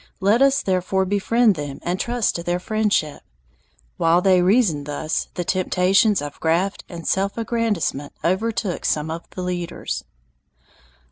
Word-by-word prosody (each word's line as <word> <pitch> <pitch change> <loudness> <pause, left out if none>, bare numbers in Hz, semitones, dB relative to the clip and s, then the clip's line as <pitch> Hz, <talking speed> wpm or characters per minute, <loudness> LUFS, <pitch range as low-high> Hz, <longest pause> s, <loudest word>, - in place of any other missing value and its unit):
Let 205 +5 +3
us 275 0 +4
therefore 190 0 0
befriend 210 +4 +2
them 145 -4 -6
and 180 +2 -2
trust 240 -2 0
to 170 - -4
their 175 +1 -1
friendship. 205 -6 0 0.8
While 165 +1 +4
they 185 -1 +4
reasoned 180 - +2
thus, 150 +2 -2
the 175 - -2
temptations 185 +1 +2
of 145 -1 -7
graft 175 +5 0
and 170 -2 -8
self 195 +2 0
aggrandizement 220 - -1
overtook 190 +1 -1
some 155 +1 0
of 165 +1 -7
the 185 - -6
leaders. 180 -1 -4
185 Hz, 140 wpm, -22 LUFS, 170-210 Hz, 0.8 s, us